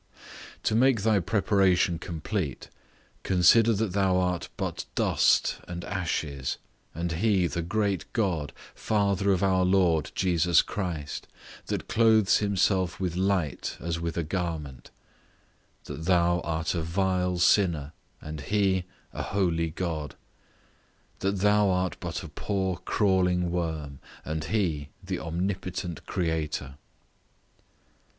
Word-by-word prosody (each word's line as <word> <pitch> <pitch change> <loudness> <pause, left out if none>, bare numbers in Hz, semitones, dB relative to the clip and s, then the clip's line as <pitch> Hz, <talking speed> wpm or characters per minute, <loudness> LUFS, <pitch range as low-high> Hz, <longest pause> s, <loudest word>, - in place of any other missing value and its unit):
To - - +1
make 120 -2 +3
thy 110 -2 +3
preparation 95 -3 +2
complete, 85 -3 -4 0.5
consider 95 +5 +5
that 105 -2 -1
thou 95 -2 +2
art 90 -2 -1
but - - -3
dust - - +3
and 85 -1 -6
ashes; 80 -8 -2 0.4
and 85 +1 -2
he 95 +2 +2
the 85 +1 -2
great 100 +2 -1
God, 85 - -1 0.2
Father 100 -2 +1
of 95 0 +1
our 95 -1 +3
Lord 90 -4 +2
Jesus 85 -2 +3
Christ, 85 -7 -4 0.4
that - - -3
clothes 110 -3 +4
himself 95 -3 +1
with 90 -3 -2
light 95 -5 -1
as 85 0 -3
with 85 0 -3
a 85 - 0
garment; 75 -6 -4 0.9
that 75 +2 -7
thou 85 -1 +3
art 80 -1 -2
a 85 - -1
vile 90 +1 0
sinner, 85 -5 +3 0.3
and 75 -1 -7
he 95 +1 +1 0.3
a - - -4
holy 85 -4 0
God; 80 -3 -4 1.0
that 100 -1 -1
thou 105 0 +4
art 90 0 0
but 90 +1 -4
a - - -7
poor 95 +4 -2
crawling 90 -3 +2
worm, 80 -5 -3 0.3
and 80 0 -3
he 80 -10 -1
the 95 -1 -3
omnipotent 90 0 -4
Creator. 80 -5 -2
90 Hz, 120 wpm, -27 LUFS, 80-95 Hz, 1.0 s, consider